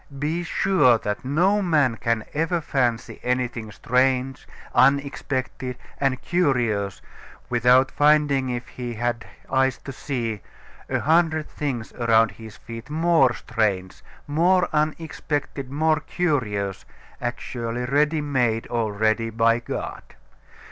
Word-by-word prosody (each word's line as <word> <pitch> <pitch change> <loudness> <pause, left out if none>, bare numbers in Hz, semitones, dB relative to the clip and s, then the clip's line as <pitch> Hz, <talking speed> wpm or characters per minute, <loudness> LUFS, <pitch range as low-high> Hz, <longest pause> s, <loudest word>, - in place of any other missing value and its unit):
Be 155 +5 -1
sure 175 -8 +3
that 105 -1 -4
no 180 +10 +2
man 150 - +2
can 115 -1 -1
ever 165 +3 0
fancy 125 -7 -1
anything 125 -3 -2
strange, 130 +4 0 0.3
unexpected, 135 -2 +1 0.2
and 135 -2 +1
curious, 120 - 0 0.5
without 125 +2 +4
finding 145 -3 +3
if 120 0 -4
he 120 -2 -6
had 120 +1 -2 0.2
eyes 135 -1 +1
to 135 - -6
see, 120 -6 -3 0.5
a - - 0
hundred 160 -1 +2
things 130 -7 -4
around 115 -3 +3
his 110 0 -12
feet 115 +2 -9
more 160 -4 +3
strange, 100 -5 -2 0.2
more 175 +5 +3
unexpected, 150 -3 -2
more 155 +3 +2
curious, 110 - -1 0.4
actually 120 -1 -3
ready 150 +4 +2
made 125 -6 0
already 110 0 0
by 115 +1 +2
God. 120 - -5
130 Hz, 115 wpm, -24 LUFS, 115-150 Hz, 0.5 s, without